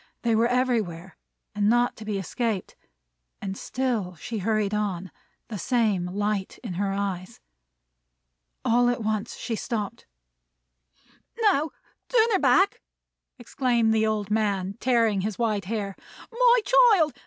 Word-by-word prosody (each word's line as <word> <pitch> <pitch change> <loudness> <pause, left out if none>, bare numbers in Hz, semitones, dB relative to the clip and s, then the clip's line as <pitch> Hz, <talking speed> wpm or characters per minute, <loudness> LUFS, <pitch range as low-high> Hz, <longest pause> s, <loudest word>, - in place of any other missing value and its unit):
They 235 -1 +2
were 225 +2 +3
everywhere, 220 -9 -1 0.4
and 205 0 +2
not 240 +1 +2
to 220 - -9
be 210 -2 -2
escaped. 205 +2 -3 0.6
And 195 -1 -4
still 225 -7 -2
she 220 +7 -5
hurried 215 0 0
on; 190 -4 -2 0.4
the 215 -4 -6
same 210 -6 +1
light 205 +1 -2
in 215 -7 -5
her 195 +2 -1
eyes. 195 -2 -4 1.3
All 240 +1 +4
at 245 -2 -1
once 215 +1 -2
she 230 - -4
stopped. 215 -2 -4 1.3
"Now, 370 -9 +3 0.4
turn 460 -2 +4
her 390 - +3
back!" 350 +9 +3 0.6
exclaimed 240 -2 +1
the 220 0 +2
old 210 -2 -2
man, 200 -3 0
tearing 230 -6 +2
his 210 0 -3
white 215 -5 0
hair. 200 -1 -3 0.4
"My - - +5
child! 450 - +5
220 Hz, 130 wpm, -26 LUFS, 200-245 Hz, 1.3 s, My